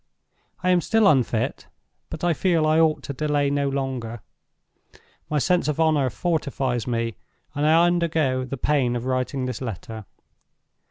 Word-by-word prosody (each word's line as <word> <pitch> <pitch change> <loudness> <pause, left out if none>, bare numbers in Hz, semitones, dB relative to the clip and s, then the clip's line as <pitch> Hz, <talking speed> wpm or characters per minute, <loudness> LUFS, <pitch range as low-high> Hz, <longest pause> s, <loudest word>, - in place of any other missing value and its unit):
I 185 - +3
am 180 -1 +3
still 220 +4 +3
unfit, 135 - +1 0.4
but - - -7
I 175 -1 +3
feel 165 -1 +1
I 155 +1 +3
ought 160 -1 +2
to 140 - -5
delay 145 0 0
no 140 -1 0
longer. 130 -5 -4 1.1
My 150 - 0
sense 175 +4 +1
of 150 0 -1
honor 155 -5 +3
fortifies 135 -5 -2
me, 115 -1 -1 0.4
and 145 +1 0
I 165 +2 +5
undergo 160 -7 +1
the 130 +2 -5
pain 130 -3 +1
of 120 0 -4
writing 130 +1 -1
this 125 -2 -5
letter. 110 -1 -6
140 Hz, 155 wpm, -23 LUFS, 125-160 Hz, 1.1 s, I